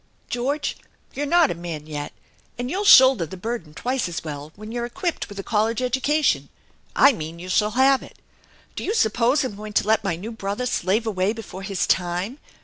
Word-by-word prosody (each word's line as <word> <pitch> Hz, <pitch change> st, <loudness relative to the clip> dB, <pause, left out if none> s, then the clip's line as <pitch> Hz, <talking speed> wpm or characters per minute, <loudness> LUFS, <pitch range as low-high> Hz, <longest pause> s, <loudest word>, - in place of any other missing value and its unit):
" -, -, -37 dB
George, 275 Hz, +5 st, -1 dB, 0.4 s
you're 290 Hz, +1 st, -2 dB
not 340 Hz, 0 st, +4 dB
a -, -, 0 dB
man 165 Hz, -3 st, -6 dB
yet, 150 Hz, -1 st, -5 dB, 0.5 s
and 245 Hz, +2 st, -3 dB
you'll 390 Hz, +4 st, -1 dB
shoulder 260 Hz, -, +8 dB
the 190 Hz, -, -9 dB
burden 205 Hz, -5 st, -5 dB
twice 245 Hz, +6 st, -2 dB
as 170 Hz, -, -5 dB
well 150 Hz, -1 st, -7 dB
when 215 Hz, +2 st, -9 dB
you're 240 Hz, 0 st, -3 dB
equipped 345 Hz, +5 st, -3 dB
with 205 Hz, -, -10 dB
a 195 Hz, -, -4 dB
college 220 Hz, +2 st, 0 dB
education. 265 Hz, +4 st, +1 dB, 0.5 s
I 275 Hz, -, +6 dB
mean 160 Hz, -4 st, -6 dB
you 180 Hz, +2 st, -8 dB
shall 210 Hz, +4 st, +1 dB
have 265 Hz, 0 st, +5 dB
it. -, -, -13 dB, 0.6 s
Do -, -, -5 dB
you 425 Hz, -, -1 dB
suppose 240 Hz, -, +2 dB
I'm 255 Hz, -6 st, -4 dB
going 210 Hz, +1 st, -8 dB
to -, -, +2 dB
let 220 Hz, +1 st, +2 dB
my 195 Hz, -4 st, 0 dB
new 205 Hz, +7 st, -7 dB
brother 205 Hz, +2 st, -3 dB
slave 215 Hz, -1 st, 0 dB
away 200 Hz, -1 st, 0 dB
before 220 Hz, -4 st, -8 dB
his 195 Hz, -1 st, -1 dB
time? 180 Hz, +8 st, -1 dB
220 Hz, 205 wpm, -23 LUFS, 185-255 Hz, 0.6 s, shoulder